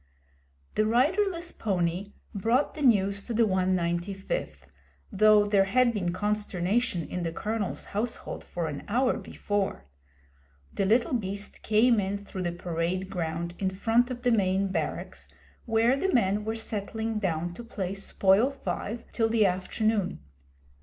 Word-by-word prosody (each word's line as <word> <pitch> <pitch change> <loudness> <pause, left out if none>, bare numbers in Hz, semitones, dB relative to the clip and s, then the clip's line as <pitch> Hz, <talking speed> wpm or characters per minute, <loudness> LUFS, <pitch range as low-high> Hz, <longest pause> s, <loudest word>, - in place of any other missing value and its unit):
The 215 - +2
riderless 340 - +1
pony 185 -1 -1 0.2
brought 230 +7 +1
the 305 - -8
news 200 -6 +3
to 235 - -3
the 230 - +4
195th, 180 - -1 0.4
though 215 0 +5
there 200 -1 +3
had 240 +4 +3
been 180 -5 -1
consternation 205 -1 0
in 180 - -4
the 165 -1 -2
Colonel's 210 +3 -3
household 220 +4 -3
for 170 -2 -4
an 145 -2 -5
hour 250 +5 +2
before. 200 - -3 0.9
The 195 - 0
little 235 +5 +3
beast 200 -3 -3
came 225 +2 +4
in 200 0 -1
through 200 -2 -7
the 175 -1 -1
parade 175 +2 -2
ground 170 0 -3
in 190 - +1
front 225 +6 +2
of 245 -1 -6
the 245 - +3
main 195 -2 +2
barracks, 190 - -4 0.4
where 230 +2 +3
the 380 +7 0
men 210 - +2
were 220 +1 -1
settling 220 0 -3
down 175 -3 -1
to 240 - -9
play 195 -5 -4
Spoil 195 +3 +3
five 225 -2 -4
till 225 -1 +1
the 220 -2 +4
afternoon. 195 +2 0
205 Hz, 145 wpm, -28 LUFS, 185-225 Hz, 0.9 s, though